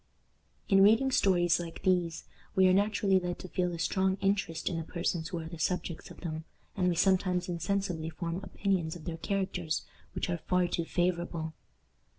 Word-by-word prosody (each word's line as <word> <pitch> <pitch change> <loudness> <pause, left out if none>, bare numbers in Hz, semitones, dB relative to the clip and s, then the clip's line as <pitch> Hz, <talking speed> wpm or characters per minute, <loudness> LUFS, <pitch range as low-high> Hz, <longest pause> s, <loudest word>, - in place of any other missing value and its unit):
In 195 -2 +5
reading 225 +7 +5
stories 175 -7 +3
like 170 -1 -7
these, 175 -3 +1 0.3
we 190 -1 +6
are 185 - +5
naturally 200 -1 +3
led 180 -1 -3
to 185 - -8
feel 180 0 0
a 170 - -4
strong 190 +3 +1
interest 195 -4 0
in 175 - 0
the 165 - -2
persons 170 0 -2
who 175 - -4
are 160 -1 -5
the 165 -1 -8
subjects 175 0 -2
of - - -12
them, 160 -2 -4 0.3
and 185 -2 +1
we 175 - +1
sometimes 180 -1 +2
insensibly 175 -1 -1
form 170 +1 -4
opinions 185 -5 -1
of 165 - -10
their 165 -2 -4
characters 180 -3 -2 0.3
which - - -1
are 175 -1 -2
far 180 +2 +1
too 170 -1 -1
favorable. 170 -2 -1
180 Hz, 180 wpm, -31 LUFS, 165-190 Hz, 0.3 s, we